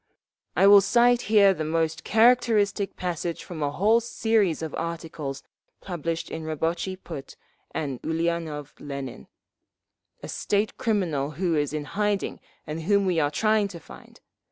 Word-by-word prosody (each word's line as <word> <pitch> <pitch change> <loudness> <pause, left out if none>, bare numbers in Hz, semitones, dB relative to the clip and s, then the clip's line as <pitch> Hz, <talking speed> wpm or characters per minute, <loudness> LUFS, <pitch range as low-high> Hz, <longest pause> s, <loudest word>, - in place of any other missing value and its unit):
"I - - +4
will 200 0 +9
cite 240 +4 +4
here 200 -3 +6
the 160 - -4
most 160 0 -1
characteristic 220 -3 +3
passage 175 -2 -3
from 165 -3 -7
a 145 - +1
whole 210 +10 +3
series 220 -7 +1
of 160 - -5
articles 165 -4 -5 0.4
published 165 -2 -4
in 160 - -5
Rabotchi 165 +4 -2
Put 160 -7 -9 0.4
by 140 -6 -3
Ulianov 160 -3 -2
Lenin, 140 - -7 1.0
a - - -5
state 205 +1 -1
criminal 170 -11 0
who 175 -2 0
is 145 -2 0
in 150 -1 -3
hiding 205 +3 -1 0.3
and 155 +2 -5
whom 200 +4 +2
we 180 -3 +1
are 145 -2 +2
trying 215 +6 +2
to 180 -4 -9
find…. - - -15
170 Hz, 145 wpm, -26 LUFS, 155-205 Hz, 1.0 s, will